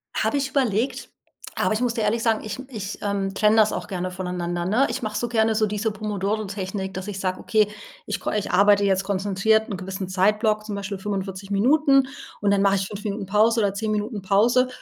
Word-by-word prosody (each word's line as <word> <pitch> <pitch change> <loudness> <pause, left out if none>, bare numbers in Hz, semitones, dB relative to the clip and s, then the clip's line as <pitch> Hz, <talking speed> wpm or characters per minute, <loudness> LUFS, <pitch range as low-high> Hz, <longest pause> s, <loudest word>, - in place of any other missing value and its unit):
Habe 290 - +1
ich 270 -1 -1
überlegt, 250 -3 0 0.5
aber - - +1
ich 220 - -1
muss 245 -2 +1
dir 225 - -1
ehrlich 220 +2 +1
sagen: 225 -2 +1
ich 215 +1 -5
ich, 210 -5 -6
ähm, 200 -1 -1
trenne 210 +2 +3
das 215 -1 +4
auch - - -4
gerne 185 -2 -3
voneinander, 180 -1 -3
ne? 225 +9 +3
Ich 260 - -3
mache 215 -2 -3
so 240 - -1
gerne 225 -1 +2
so 215 - +3
diese 210 +1 -1
Pomodoro-Technik, 200 -2 -3
dass 190 +1 -6
ich 200 -2 -5
sage: 185 -1 -2
„Okay 215 -2 +2 0.4
ich - - -3
ko - - -3
ich 210 -1 -2
arbeite 205 +2 +5
jetzt 190 -1 +2
konzentriert 200 +3 +1
'n 195 - -3
gewissen 190 +1 -5
Zeitblock 210 +3 +2
zum 210 -2 -4
Beispiel 200 0 -4
45 195 -1 -4
Minuten 275 +6 +4 0.3
und 205 -1 +2
dann 200 -1 +3
mache 200 0 +4
ich 195 0 -1
5 205 0 -8
Minuten 205 -1 -3
Pause 215 +4 +3
oder 200 -1 +1
10 215 +1 -2
Minuten 210 0 -2
Pause 225 +6 +3
205 Hz, 215 wpm, -24 LUFS, 195-220 Hz, 0.5 s, arbeite